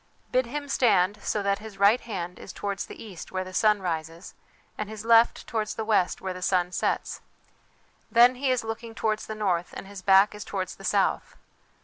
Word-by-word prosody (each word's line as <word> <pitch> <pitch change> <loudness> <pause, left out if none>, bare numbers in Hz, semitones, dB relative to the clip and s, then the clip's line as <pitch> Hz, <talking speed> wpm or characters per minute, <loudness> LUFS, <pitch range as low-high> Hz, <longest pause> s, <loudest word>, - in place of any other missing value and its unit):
Bid 255 -1 +2
him 285 +4 -5
stand 205 -7 +2
so 210 - -1
that 200 0 +1
his 215 -2 -10
right 200 +5 +4
hand 180 -6 -6
is - - -9
towards 200 +1 -4
the - - -10
east 195 -6 -10
where 185 0 -2
the 185 0 -10
sun 210 0 +3
rises, 165 0 -4 0.4
and 210 -1 -5
his 220 0 -8
left 230 0 +4
towards 215 -2 -2
the 220 - -3
west 205 -5 +1
where 190 -1 -3
the 180 - -9
sun 180 -1 +1
sets. 180 - -2 0.9
Then 240 +2 +6
he 260 +1 -2
is 255 -2 +1
looking 225 0 -6
towards 215 -1 -1
the 215 - -5
north 180 -5 -1
and - - -7
his 200 -1 -10
back 195 +2 +5
is 210 - -7
towards 185 -2 -4
the 195 - -13
south. 200 -1 0
205 Hz, 205 wpm, -26 LUFS, 185-225 Hz, 0.9 s, Then